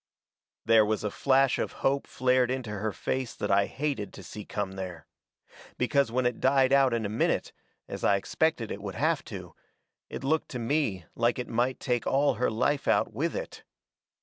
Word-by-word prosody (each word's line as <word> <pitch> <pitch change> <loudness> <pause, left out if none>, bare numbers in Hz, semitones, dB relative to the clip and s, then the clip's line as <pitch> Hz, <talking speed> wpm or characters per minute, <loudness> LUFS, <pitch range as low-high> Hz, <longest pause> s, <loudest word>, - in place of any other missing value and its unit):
There 115 -1 +6
was 105 0 -1
a 105 - -1
flash 135 +2 +3
of - - -2
hope 140 +1 +1
flared 125 -1 +2
into 130 -4 -3
her 105 +1 -2
face 130 +4 -3
that 105 - -2
I 100 0 +4
hated 140 -8 -3
to - - -10
see 105 - -8
come 100 -2 -3
there. 95 -3 -7 0.7
Because 135 0 +2
when 125 +1 0
it 125 -1 0
died 135 0 +3
out 135 -2 +5
in 115 -2 -1
a - - 0
minute, 105 +2 0 0.3
as - - -7
I 100 - +4
expected 120 +3 0
it 100 - -5
would 100 -2 -6
have - - +1
to, - - -8 0.6
it - - -6
looked 155 +3 0
to 125 - -5
me 115 - -1
like 120 +1 +1
it 125 - -4
might 125 +3 0
take 125 -2 -1
all 140 +1 +3
her - - +3
life 140 +6 0
out - - +2
with - - -1
it. - - -6
125 Hz, 195 wpm, -28 LUFS, 105-135 Hz, 0.7 s, There